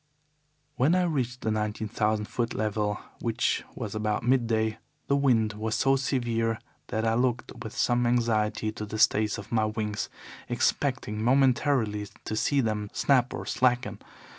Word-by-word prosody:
"When 145 +8 +4
I 185 - +3
reached 130 -7 -1
the 110 - 0
nineteen 110 0 -2
thousand 105 -1 0
foot 115 +2 -2
level, 105 -1 -1 0.2
which 115 0 0
was 110 -6 -5
about 105 0 -1
midday, 115 -3 +1 0.3
the 140 - +2
wind 120 -6 +3
was 110 +1 -2
so 135 0 +3
severe 120 -4 0 0.3
that 110 +2 -1
I 110 - +2
looked 120 0 0
with 110 - -8
some 120 0 +2
anxiety 110 -3 +1
to 105 0 -6
the 110 - -5
stays 105 -1 +3
of 100 - -9
my 110 -2 +2
wings, 105 -1 -2 0.4
expecting 130 -6 0
momentarily 125 -4 +2 0.2
to 110 - -2
see 140 +5 +2
them 105 -3 -2
snap 130 -3 +3
or - - -5
slacken. 125 -1 +1
115 Hz, 155 wpm, -27 LUFS, 110-125 Hz, 0.4 s, When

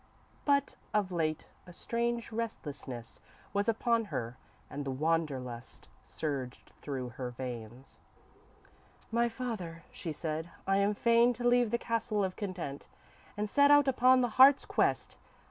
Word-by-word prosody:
_ - - -33 0.4
But, 280 -1 +2 0.2
of 200 -3 +1
late, 155 -3 -1 0.2
a 175 - -11
strange 235 +4 -2
restlessness 145 - -6 0.3
was 205 +2 +1
upon 230 0 +1
her, 120 - -4 0.3
and 145 - -5
the 140 - -4
wander 155 +1 0
lust 125 0 -9 0.2
surged 135 -5 -5
through 130 -4 -4
her 125 +1 -5
veins. 120 0 -8 1.1
_"My 235 +1 +2
father," 215 -9 -5
she 165 - -5
said, 160 +1 -4 0.2
"I 195 0 +2
am 200 +1 +2
fain 235 +2 +4
to 240 +1 -1
leave 245 -1 +4
the 235 - +1
Castle 225 -3 -1
of 185 -1 -2
Content, 180 -9 -5 0.5
and 210 +1 -1
set 285 +6 +4
out 290 -1 +6
upon 255 0 +5
the 245 - +1
Heart's 275 +1 +8
Quest. - - 0
195 Hz, 145 wpm, -31 LUFS, 140-235 Hz, 1.1 s, Heart's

